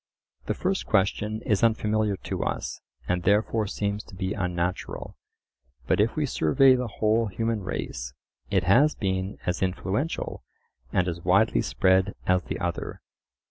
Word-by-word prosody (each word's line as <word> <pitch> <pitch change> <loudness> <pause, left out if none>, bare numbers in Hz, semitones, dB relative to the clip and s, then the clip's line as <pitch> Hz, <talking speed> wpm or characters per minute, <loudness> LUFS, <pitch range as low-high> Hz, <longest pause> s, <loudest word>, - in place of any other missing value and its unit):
The - - 0
first - - -1
question 105 +3 +1
is 105 -1 +1
unfamiliar 110 -2 +2
to - - -3
us, - - -3 0.3
and 90 0 0
therefore 105 +3 +2
seems 100 +1 -2
to - - -13
be 95 +1 -2
unnatural; 90 -1 -3 0.7
but - - +1
if 110 - +1
we 155 -2 +1
survey 130 - +4
the 125 -1 0
whole 110 +1 +1
human 115 +2 -1
race, 60 -9 -5 0.3
it 95 -3 +2
has 130 - +4
been 95 -1 -2
as 90 - -1
influential 95 - -2 0.5
and 90 -1 +2
as 85 -1 -3
widely 95 +6 +3
spread 95 +10 +2
as 90 0 +3
the - - -5
other. - - -3
100 Hz, 145 wpm, -26 LUFS, 90-110 Hz, 0.7 s, survey